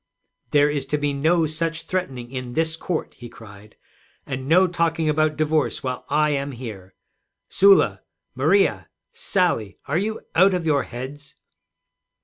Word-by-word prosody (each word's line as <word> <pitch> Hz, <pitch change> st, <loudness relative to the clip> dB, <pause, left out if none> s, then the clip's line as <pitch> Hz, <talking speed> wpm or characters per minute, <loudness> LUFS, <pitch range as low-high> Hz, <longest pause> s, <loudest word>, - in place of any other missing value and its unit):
'There 145 Hz, 0 st, +4 dB
is 145 Hz, -2 st, -2 dB
to 150 Hz, -, 0 dB
be 145 Hz, -1 st, -1 dB
no 160 Hz, +4 st, +2 dB
such 160 Hz, +1 st, -3 dB
threatening 135 Hz, -10 st, -4 dB
in 125 Hz, -2 st, -6 dB
this 160 Hz, +1 st, 0 dB
court,' 165 Hz, 0 st, -4 dB
he 120 Hz, -1 st, -9 dB
cried; 105 Hz, -1 st, -14 dB, 0.5 s
'and 130 Hz, 0 st, -5 dB
no 180 Hz, +5 st, +5 dB
talking 165 Hz, -2 st, 0 dB
about 155 Hz, 0 st, +1 dB
divorce 155 Hz, -1 st, 0 dB
while 130 Hz, -1 st, -4 dB
I 150 Hz, +1 st, +2 dB
am 140 Hz, -1 st, -2 dB
here. 105 Hz, -7 st, -9 dB, 0.5 s
Sula! 190 Hz, -, +4 dB, 0.3 s
Maria! 160 Hz, +10 st, +2 dB, 0.2 s
Sally! 180 Hz, -, 0 dB
Are 150 Hz, +5 st, 0 dB
you 215 Hz, +3 st, -3 dB
out 190 Hz, +2 st, +5 dB
of 175 Hz, -2 st, -3 dB
your 145 Hz, -3 st, +2 dB
heads?' 130 Hz, +4 st, -9 dB
150 Hz, 145 wpm, -23 LUFS, 130-165 Hz, 0.5 s, no